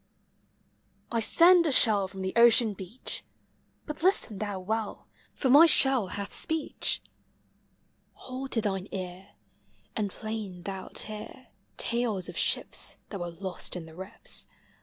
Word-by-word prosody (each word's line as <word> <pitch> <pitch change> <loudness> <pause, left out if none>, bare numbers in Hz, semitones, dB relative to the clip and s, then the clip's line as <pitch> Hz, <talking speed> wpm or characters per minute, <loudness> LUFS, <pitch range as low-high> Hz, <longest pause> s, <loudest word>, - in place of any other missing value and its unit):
I 230 -1 0
bend 345 0 +7
a - - +1
shell 210 -6 +6
from 190 0 -8
the 190 - -3
ocean 235 -2 +6
beach; 195 +5 -4 0.6
Hut 300 0 -6
listen 325 - +1
thou 205 -3 -3
well, 215 +3 -3 0.3
for 270 - -1
mv 295 +6 +8
shell 265 -8 +5
hath 200 +2 -6
speech. 320 -2 -2 1.1
Hold 265 +1 -7
to 225 - +2
thine 195 -2 -2
ear, 185 +1 -7 0.6
And 210 -2 -1
plain 210 -4 -6
thou 190 0 -6
'It - - -9
hear 215 +4 -9 0.3
Talcs 230 -6 -1
of - - -9
ships - - 0
Thai 200 - -4
were 175 -2 -4
lost 185 +2 -4
in 175 -2 -6
the 160 - -13
rips. 190 +3 -7
210 Hz, 140 wpm, -28 LUFS, 190-250 Hz, 1.1 s, mv